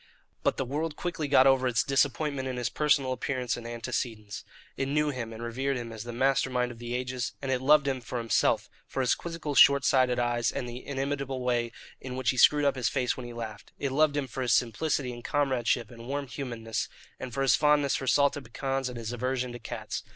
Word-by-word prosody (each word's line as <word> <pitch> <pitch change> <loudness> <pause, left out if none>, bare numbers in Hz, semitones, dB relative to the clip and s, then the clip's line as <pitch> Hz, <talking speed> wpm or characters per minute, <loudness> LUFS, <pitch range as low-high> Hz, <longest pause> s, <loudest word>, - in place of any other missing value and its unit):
But - - +1
the 135 - -1
world 150 +4 -2
quickly 165 -3 -3
got 135 -2 +6
over 135 -1 +4
its 115 -3 +2
disappointment 140 0 +1
in 130 -1 -3
his 120 -1 -1
personal 145 -3 +2
appearance 130 -2 -1
and 120 -1 -7
antecedents. 115 -3 -4 0.3
It 135 - -1
knew 150 +2 +1
him 120 -4 -5
and 115 +1 -7
revered 130 +3 -1
him 120 -1 -6
as 110 0 -7
the 120 - -5
master 135 +2 +2
mind 125 -1 0
of 115 - -12
the 120 0 -4
ages; 125 -1 -3
and 135 -1 -3
it 130 -1 0
loved 145 +1 +5
him 130 -2 -1
for 125 - -5
himself, 115 -2 +1 0.2
for 135 - -2
his 125 - +3
quizzical 165 -3 -4
short 140 0 +7
sighted 130 -2 +3
eyes 120 -1 +1
and 125 - -4
the 120 +1 -7
inimitable 135 -1 -3
way 120 -2 0 0.3
in 130 -1 -6
which 130 -2 +1
he 130 - -6
screwed 145 +3 +6
up 140 - +3
his 125 - +1
face 125 -3 0
when 125 -2 -7
he 120 - -8
laughed; 110 -3 -7
it 140 - -2
loved 145 +1 +3
him 145 - 0
for 130 +1 -6
his 120 -2 +2
simplicity 125 +2 +1
and 120 0 -10
comradeship 125 -5 0
and 115 0 -11
warm 140 +1 -2
humanness, 120 -4 -4 0.3
and 130 - -6
for 135 +3 -1
his 135 - +5
fondness 150 -2 +3
for 135 - -3
salted 140 +1 +3
pecans 135 +2 -2
and 125 - -7
his 115 0 -4
aversion 125 +1 -2
to 120 - -7
cats. 115 - -5
130 Hz, 225 wpm, -28 LUFS, 120-140 Hz, 0.3 s, short